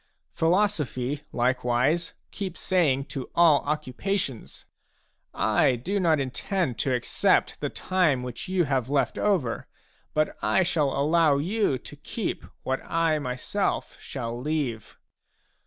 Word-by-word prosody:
Philosophy 160 -7 0
like 125 +1 +1
wise 130 +8 +1 0.2
keeps 190 -3 -5
saying 150 -8 +2
to 135 -3 -6
all 165 -4 +6
occupations: 150 - -3 0.4
" - - -47 0.3
I 130 - +4
do 185 - -2
not 165 -5 +3
in 135 -2 -2
tend 160 - -2
to 135 - +1
accept 120 - +1
the - - -2
time 165 -9 +1
which 125 -2 -6
you 185 -1 +2
have 135 -4 0
left 140 -1 +1
over, 175 - 0 0.5
but 155 0 +1
I 190 - +3
shall 160 -5 +1
allow 155 0 +4
you 180 -1 +1
to - - -11
keep - - -4 0.2
what 130 0 -1
I 165 -2 +1
myself 135 +9 -2
shall 120 -3 -5
leave." 130 -7 -3
150 Hz, 135 wpm, -26 LUFS, 130-175 Hz, 0.5 s, all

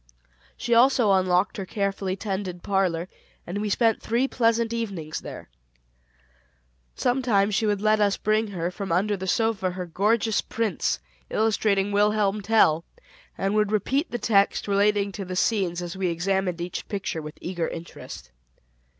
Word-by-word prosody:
She 240 -1 -1
also 240 -2 +5
unlocked 185 +2 +2
her 195 - -4
carefully 195 -2 -2
tended 190 -3 -4
parlor 185 -3 0 0.4
and 180 +4 -4
we 210 - -1
three 225 +2 +3
spent 245 +4 0
pleasant 230 -1 +2
evenings 195 -10 -4
there. - - -9 1.5
Sometimes 235 -5 +1
she 215 +2 +1
would 205 -1 0
let 215 0 +4
us 205 -1 +2
bring 215 +1 +1
her, 175 -3 -3
from 195 0 -5
under 200 +5 +2
the 190 -1 -6
sofa, 220 -2 +1
her 180 0 -5
gorgeous 210 +5 +1
prints, 215 - -1 0.3
illustrating 205 -2 +1
"Wilhelm 210 0 +2
Tell," 195 -7 +3 0.5
and 195 +1 0
would 210 -1 +2
repeat 265 - 0
the 240 - -3
text 200 -4 +2
relating 200 0 +2
to 195 - -6
the 185 0 -5
scenes 180 -3 0
as 175 0 -6
we 190 -1 -1
examined 180 +1 -1
each 175 0 -5
picture 195 -5 -3
with 150 0 -9
eager 175 -2 -3
interest. 165 - -9
200 Hz, 150 wpm, -25 LUFS, 185-215 Hz, 1.5 s, also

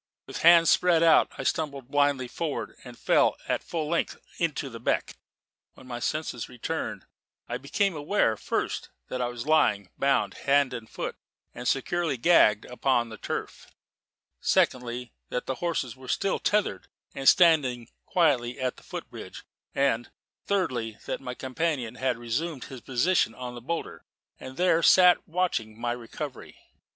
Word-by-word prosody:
With - - -7
hands 170 0 +7
spread 175 -2 +4
out, 165 -1 +5
I - - -4
stumbled 140 -6 -2
blindly 145 -3 +2
forward 155 +4 -4
and 125 -2 -11
fell - - +3
at - - 0
full 160 -3 -3
length 170 +2 -1 0.2
into 160 -4 -1
the 115 -3 -8
beck. - - -1 0.6
When - - -15
my 120 -2 -6
senses 150 -3 -3
returned, 125 -2 -4 0.4
I 120 - -3
became 180 +7 0
aware, 145 - +1
first - - -3 0.2
that 130 - -3
I 120 - +1
was 120 0 -6
lying, 105 - +2
bound 140 0 +2 0.2
hand 140 -2 +4
and 115 -3 -7
foot - - -5 0.4
and 125 - -6
securely 160 +3 0
gagged, 115 -7 +5
upon 125 -1 0
the 110 -2 -10
turf; - - -5 0.7
secondly, 125 -1 0 0.2
that 125 - -3
the 130 - -4
horses 160 -8 -1
were 130 0 -13
still 195 +8 0
tethered, 210 -1 0 0.3
and 135 -2 +4
standing 135 -9 +4 0.2
quietly 135 -8 +2
at 130 -1 -2
the - - -16
foot - - -7
bridge; - - -9 0.3
and, 135 -4 +1 0.4
thirdly, 125 - -1
that - - -4
my 125 -2 -6
companion 130 -3 -2
had 125 -1 -1
resumed 130 +5 -3
his 130 -2 -9
position 130 0 +1
on 125 0 -6
the 120 - -9
boulder, 165 +7 -4 0.4
and 130 0 -9
there 175 -2 +3
sat 180 0 +6
watching 160 -11 -1
my 120 0 -1
recovery. 125 +3 -7
130 Hz, 155 wpm, -27 LUFS, 120-165 Hz, 0.7 s, hands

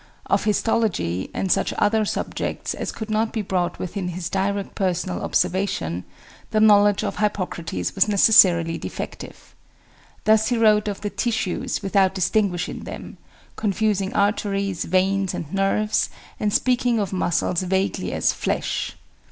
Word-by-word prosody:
Of - - +1
histology, 205 - 0
and 190 - -2
such - - +1
other 215 +1 +2
subjects - - -3
as - - -4
could 220 -1 -6
not 220 +1 +1
be 220 - -2
brought 180 -2 -1
within 185 +1 -4
his 175 -1 -4
direct 195 +1 -1
personal 185 -1 -1
observation, 90 - -1 0.4
the 215 - +1
knowledge 205 -1 +5
of - - -3
Hippocrates 175 - -2
was - - +3
necessarily 180 -5 +5
defective. - - -8 0.7
Thus 220 0 +4
he 245 - +1
wrote 215 -2 +4
of 205 -1 -4
the 205 -1 -3
tissues 220 -4 -2
without 195 -1 +2
distinguishing 190 -1 0
them; - - -9 0.4
confusing 205 -2 0
arteries, 200 -2 0
veins, 190 +1 +1
and 155 +1 -6
nerves, 195 +2 +1 0.3
and 210 - 0
speaking 245 0 +2
of 195 -2 -2
muscles 175 -1 0
vaguely 190 +1 -1
as - - +1
"flesh." - - -2
195 Hz, 135 wpm, -23 LUFS, 185-215 Hz, 0.7 s, knowledge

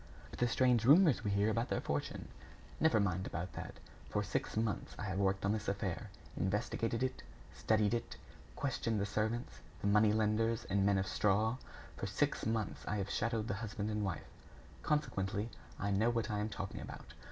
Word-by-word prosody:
"But - - -9
the 120 - +4
strange 125 -1 +3
rumors 150 0 +6
we 105 - 0
hear 100 +2 +2
about 115 +2 0
their - - +1
fortune?" - - -3 0.5
"Never 160 -8 +4
mind 95 -2 0
about 85 +1 -4
that. - - -6 0.3
For - - 0
six - - -2
months, 110 -2 -1
I - - -5
have 95 -2 -2
worked 95 -1 +1
on 100 - +3
this 110 0 -2
affair, 100 -3 -2 0.3
investigated 115 +4 0
it, 130 0 -2 0.3
studied 110 0 +2
it, 120 - -2 0.4
questioned 115 -5 -1
the 100 - +1
servants, 110 +3 -2 0.2
the - - -5
money 105 +1 +5
lenders 110 +1 +1
and 100 0 +1
men 100 0 +4
of 95 - +1
straw; 105 +4 +2 0.4
for - - -3
six - - 0
months, 110 -1 -1
I 105 - 0
have 100 0 -2
shadowed 115 -1 0
the - - 0
husband 105 -1 -3
and 105 0 -1
wife. 95 -3 -2 0.6
Consequently, 110 -8 0 0.3
I 100 0 0
know 105 +4 +3
what 115 -2 0
I 105 - 0
am 105 +1 -1
talking 100 -1 -5
about. - - -9
105 Hz, 185 wpm, -35 LUFS, 100-115 Hz, 0.6 s, rumors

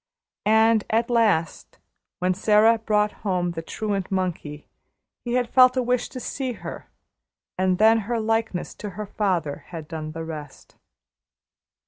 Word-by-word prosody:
And 220 0 +4
at 230 +2 +1
last, 210 -9 +1 0.4
when 180 +1 +1
Sara 215 +3 +4
brought 210 -1 +1
home 180 -3 0
the 165 -1 -5
truant 200 +2 -3
monkey, 175 -6 -3 0.6
he 240 - -3
had 250 -1 +1
felt 255 +1 +5
a 255 - +2
wish 250 0 0
to 255 - -7
see 260 0 -3
her, - - -9 0.7
and 185 0 +1
then 220 +3 +5
her 230 +2 -2
likeness 225 -4 -1
to 210 - -6
her 210 - -4
father 180 -8 -2
had 160 -3 -8
done 155 -1 -6
the 165 0 -5
rest. 150 -3 -9
210 Hz, 145 wpm, -24 LUFS, 175-225 Hz, 0.7 s, felt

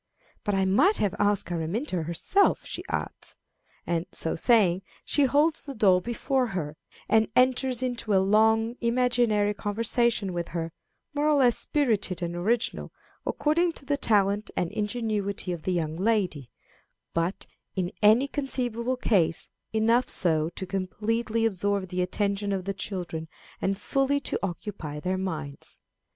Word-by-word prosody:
"But 205 - 0
I 190 0 +2
might 280 - +4
have 200 -3 0
asked 205 -4 +1
Araminta 175 - -2
herself," 170 - +2
she - - -5
adds; - - -4 0.5
and, 170 +1 -1
so 165 - -2
saying, 190 -3 +3 0.2
she 290 - +3
holds 300 +5 +2
the 280 -2 -8
doll 190 -5 +4
before 250 +4 0
her, 160 -8 -4 0.3
and 220 +1 +4
enters 255 0 +2
into 245 -4 -3
a - - +6
long 220 +4 +3
imaginary 235 -4 +2
conversation 210 0 0
with 170 -1 -3
her, 165 -1 -4 0.4
more 295 +1 +1
or 300 - +4
less 250 -4 +4
spirited 210 - 0
and 170 0 -3
original, 220 +7 -1 0.4
according 335 +3 +1
to 275 - -13
the 285 +1 +1
talent 205 -4 +2
and 175 - 0
ingenuity 210 -3 -2
of 170 -2 -4
the 185 - -1
young 160 -3 -1
lady, 185 - 0 0.6
but, 170 +3 -1 0.3
in 180 -2 -1
any 220 +6 +5
conceivable 255 -3 -2
case, 180 -9 +1 0.2
enough 230 +3 +2
so 160 -3 +2
to 190 - -6
completely 220 +5 -1
absorb 200 -2 0
the 180 0 -1
attention 200 +2 -1
of 190 -2 -2
the 195 - -2
children 180 -4 -4 0.3
and 195 0 0
fully 275 +6 +1
to - - -2
occupy 175 -5 -5
their 185 +4 -1
minds. 160 -7 -5
205 Hz, 145 wpm, -27 LUFS, 180-240 Hz, 0.6 s, a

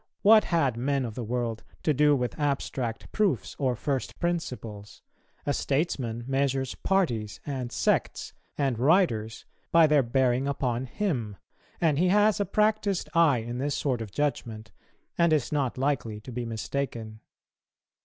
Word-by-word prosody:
What 215 +1 +7
had 140 -9 +1
men 135 +2 0
of 115 - -5
the 120 - -5
world 115 -1 -2 0.2
to 155 - +3
do 150 +1 +4
with 125 +2 -3
abstract 135 -5 -2
proofs 195 - 0
or 130 -3 +1
first 135 +2 -3
principles? 125 - -4 0.4
a 145 - +1
statesman 135 -6 -1
measures 135 -1 0
parties, 120 - -1
and 130 -4 -4
sects, 95 -5 0 0.2
and 135 -5 0
writers 120 - +2 0.3
by 165 -1 +7
their 150 -2 +4
bearing 130 +1 +1
upon 130 -2 -1
him; 125 - -2 0.4
and 155 -4 +2
he 180 - +3
has 210 +2 +4
a 205 - +1
practised 210 -1 +1
eye 155 -8 +4
in 120 +1 -4
this 145 +2 -1
sort 130 -5 -1
of 110 - -5
judgment, 110 -7 -3 0.5
and 170 -1 +4
is 150 -5 +1
not 140 -5 -1
likely 125 -6 -1
to 125 - -9
be 120 0 -4
mistaken. 115 -1 -4
135 Hz, 150 wpm, -27 LUFS, 120-155 Hz, 0.5 s, What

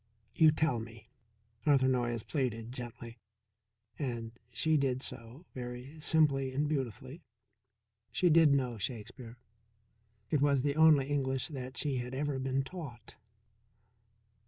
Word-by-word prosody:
"You 155 +2 +6
tell 155 -5 +1
me," 115 0 -10 0.5
Arthur 140 -3 +4
Noyes 120 -3 0
pleaded 120 -5 -2
gently. 120 -1 -8 0.8
And 120 -5 -3 0.2
she 155 +6 +1
did 135 -3 +1
so 120 +9 -8
very 125 +4 -7
simply 145 -4 +2
and 145 +3 +1
beautifully. 130 +1 -4 0.9
She 180 - +2
did 160 -2 +6
know 125 -4 -1
Shakespeare; 115 +2 -6 0.9
it 150 - +2
was 140 -2 +3
the 140 -1 0
only 155 -3 +6
English 135 0 -1
that 130 -3 -7
she 140 -3 -1
had 125 +1 -4
ever 140 -1 -1
been 135 +1 0
taught. 135 -6 -9
130 Hz, 125 wpm, -32 LUFS, 120-145 Hz, 0.9 s, You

